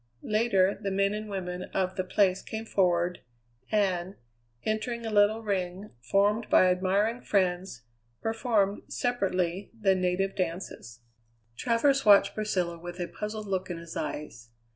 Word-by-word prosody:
Later, 210 -3 +2
the 200 - -1
men 195 +1 +1
and 215 0 -5
women 180 -2 -4
of 185 -1 0
the 185 - -1
place 185 0 +2
came 220 0 -6
forward, 180 -4 +1 0.5
and, 190 -3 0 0.5
entering 230 +2 -2
a 225 - -3
little 210 +2 +3
ring 190 -1 -3
formed 205 - +1
by - - +6
admiring 200 +6 +1
friends, 180 - 0 0.4
performed, 225 -3 0
separately, 195 -6 -1
the 195 -3 +4
native 185 +1 0
dances. 165 -10 -4 0.5
Travers 275 - +2
watched 200 -1 +6
Priscilla 180 -6 -1
with 175 +1 -8
a 175 - -2
puzzled 210 +5 -5
look 190 -2 -2
in 175 - -4
his 170 0 -9
eyes. 135 -7 -5
195 Hz, 140 wpm, -28 LUFS, 180-215 Hz, 0.5 s, by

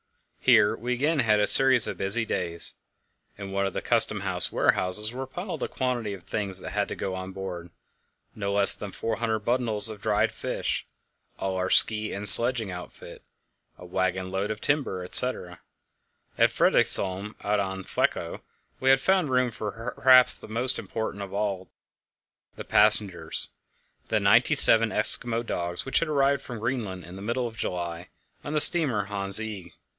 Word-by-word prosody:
Here 105 - +2
we 125 +2 -5
again 145 +5 -2
had 110 -4 +1
a 105 - +1
series 130 -2 +5
of - - -7
busy 105 +4 +1
days. 85 -5 -3 0.6
In 100 -1 -9
one 100 0 -2
of 95 - -7
the - - -6
Custom - - +3
house - - +1
warehouses 105 +5 0
were 130 +1 -7
piled 180 +7 -8
a - - -3
quantity 120 -5 -4
of 90 - -17
things 100 0 -4
that - - -9
had 105 0 -3
to - - -7
go 95 - -6
on 95 0 -8
board: 90 -3 -9 0.6
no 100 -1 -5
less 100 -1 +8
than 100 - -9
400 115 +1 -4
bundles 110 -1 0
of 105 -2 -11
dried - - -1
fish, - - -5 0.5
all 95 -1 -5
our 95 0 -3
ski 110 -1 +1
and 100 +1 0
sledging 115 0 +9
outfit, 90 0 -12 0.6
a 90 - -14
waggon 95 +1 -4
load 95 +2 -4
of 110 -1 -6
timber, 140 -11 -3
etc. 90 -3 +1 0.8
At - - +2
Fredriksholm, 100 +2 +1
out 105 0 -1
on 95 -1 -5
Flekkerö, - - -4 0.4
we 130 - -1
had 135 0 +4
found 185 +1 0
room 125 -1 -1
for 115 +3 -8
perhaps 130 -1 +6
the - - -13
most 120 +4 -1
important 110 -3 -7
of 100 -1 -9
all 100 -2 -5 0.9
the - - -10
passengers, 105 -4 0 0.6
the 110 - -1
ninety 115 +9 +2
seven 115 -5 +2
Eskimo 115 +2 -1
dogs, 85 -4 -4
which 135 - +1
had 165 - -4
arrived 140 -2 0
from 125 -3 -9
Greenland 110 -6 -5
in 90 - -13
the 95 - -11
middle 120 +4 -4
of 115 - -12
July 85 -3 -6 0.3
on - - -7
the 155 - 0
steamer 145 -10 +5
Hans 100 0 +3
Egede. 100 -6 -9
105 Hz, 170 wpm, -24 LUFS, 95-125 Hz, 0.9 s, sledging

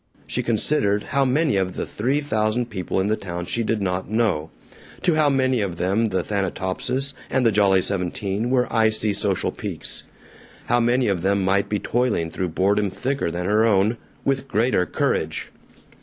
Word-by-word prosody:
She - - -1
considered 110 -3 +1
how 140 -1 +1
many 140 -2 +2
of 95 -1 -1
the - - -2
three 130 +7 -1
thousand 115 -3 0
people 95 -2 -2
in 95 - +1
the 105 +1 +2
town 90 -4 -5
she 115 - -1
did 110 -2 -1
not 90 0 -2
know; 105 -9 0 0.5
to 175 - +3
how 155 -2 +3
many 130 -3 +2
of 95 -4 -3
them 100 +6 +1
the 95 -3 -1
Thanatopsis 100 +7 -2 0.2
and 130 -2 +1
the 115 - +5
Jolly 95 -2 +4
Seventeen 100 +3 -2
were 125 -1 +2
icy 110 -2 +2
social 100 -2 0
peaks; - - -5 0.6
how 120 +1 +2
many 120 +1 +2
of 95 -4 0
them 100 +1 +1
might 100 +1 +1
be 105 - +1
toiling 110 -8 0
through 90 +1 -2
boredom 100 +4 +1
thicker 130 0 -2
than 90 +2 -3
her 105 +3 +3
own 105 0 +3 0.3
with 135 0 0
greater 115 -6 +1
courage. - - -1
105 Hz, 175 wpm, -23 LUFS, 95-125 Hz, 0.6 s, the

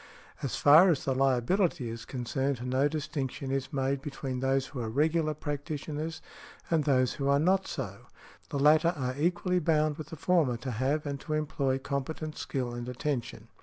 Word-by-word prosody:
As 135 - -2
far 155 +6 +7
as 155 -6 +1
the 135 - +1
liability 135 - +1
is 115 0 -6
concerned, 130 0 -2
no 130 +3 +2
distinction 145 -3 -3
is 135 -1 -2
made 135 -1 0
|163| - - -22
between 135 -2 -4
those 135 +1 +1
who 130 - -7
are 115 -2 -2
regular 155 +4 +1
practitioners 150 +2 -4 0.5
and 160 -3 +2
those 130 -3 +3
who 140 -2 -2
are 140 0 +4
not 185 +6 +2
so; 105 - -6 0.4
the - - -2
latter 155 +4 +4
are 130 -2 -2
equally 180 +4 +1
bound 155 -2 +1
with 155 - -6
the 160 - -8
former 155 -7 +2
to 125 +2 -5
have 135 +7 0
and 140 -1 -3
to 155 - -4
employ 140 -3 0
competent 140 +3 -4
skill 125 -3 -3
and 120 +1 -5
attention. 125 -4 -3
140 Hz, 180 wpm, -29 LUFS, 130-155 Hz, 0.5 s, far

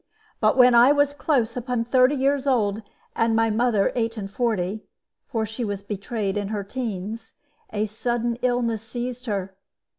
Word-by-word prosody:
But 215 +3 +3
when 250 -1 +7
I 240 +3 +7
was 285 0 +3
close 260 -6 0
upon 245 -1 -1
thirty 255 +3 +3
years 275 +1 +1
old, 220 -5 +1 0.3
and 230 0 +2
my 225 0 +2
mother 220 -2 +2
eight 230 -1 -1
and 195 -2 -5
forty 215 -3 -1 0.5
for 225 -5 -1
she 220 +3 -5
was 200 -2 -3
betrayed 200 0 -3
in 205 -1 -2
her 205 -1 -3
teens 220 -1 -5 0.4
a 215 0 0
sudden 235 +2 -2
illness 245 -3 0
seized 245 +2 -6
her. 195 -3 -3
230 Hz, 160 wpm, -24 LUFS, 210-250 Hz, 0.5 s, when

